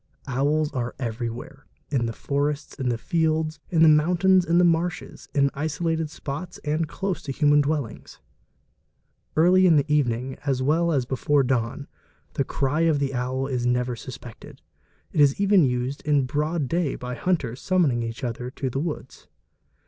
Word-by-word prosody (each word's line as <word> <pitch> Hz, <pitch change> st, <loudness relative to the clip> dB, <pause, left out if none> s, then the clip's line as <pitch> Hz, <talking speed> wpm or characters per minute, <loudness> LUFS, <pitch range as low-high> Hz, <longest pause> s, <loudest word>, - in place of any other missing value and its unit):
Owls 145 Hz, +3 st, 0 dB
are 120 Hz, -3 st, -3 dB
everywhere, 120 Hz, +3 st, -5 dB, 0.2 s
in 125 Hz, -5 st, +1 dB
the -, -, -2 dB
forests, 145 Hz, +4 st, -2 dB
in 130 Hz, -2 st, 0 dB
the 120 Hz, -, 0 dB
fields, 160 Hz, +2 st, 0 dB
in 165 Hz, -2 st, +3 dB
the -, -, +8 dB
mountains, 175 Hz, +4 st, +4 dB
in 170 Hz, +1 st, +2 dB
the 180 Hz, -, +5 dB
marshes, 175 Hz, +1 st, -1 dB
in 140 Hz, -1 st, +3 dB
isolated 160 Hz, +2 st, -2 dB
spots 155 Hz, +4 st, -6 dB
and 155 Hz, +2 st, 0 dB
close 190 Hz, +3 st, -3 dB
to 140 Hz, -, -5 dB
human 145 Hz, +1 st, +4 dB
dwellings. 145 Hz, -5 st, -3 dB, 1.2 s
Early 185 Hz, +3 st, +5 dB
in 165 Hz, -, +5 dB
the 145 Hz, -2 st, +3 dB
evening 130 Hz, -2 st, 0 dB
as 135 Hz, -3 st, 0 dB
well 160 Hz, +6 st, +2 dB
as 135 Hz, -5 st, +1 dB
before 135 Hz, +2 st, +1 dB
dawn, 125 Hz, +2 st, -1 dB, 0.5 s
the 135 Hz, -, -1 dB, 0.2 s
ery 155 Hz, +5 st, +2 dB
of 155 Hz, -3 st, +3 dB
the 140 Hz, -1 st, -1 dB
owl 130 Hz, +1 st, -2 dB
is 125 Hz, -3 st, -1 dB
never 125 Hz, 0 st, 0 dB
suspected; 120 Hz, -1 st, -10 dB, 0.5 s
it 150 Hz, -, +2 dB
is 140 Hz, +2 st, +4 dB
even 200 Hz, -3 st, +5 dB
used 125 Hz, +1 st, -1 dB
in 145 Hz, -3 st, +2 dB
broad 150 Hz, +2 st, -1 dB
day 165 Hz, -1 st, 0 dB
by 125 Hz, 0 st, -6 dB
hunters 135 Hz, -6 st, -1 dB
summoning 165 Hz, -10 st, +2 dB
each 115 Hz, +1 st, -5 dB
other 125 Hz, 0 st, -3 dB
to 130 Hz, 0 st, -4 dB
the 135 Hz, -, -2 dB
woods. 150 Hz, -4 st, -6 dB
145 Hz, 165 wpm, -24 LUFS, 125-160 Hz, 1.2 s, the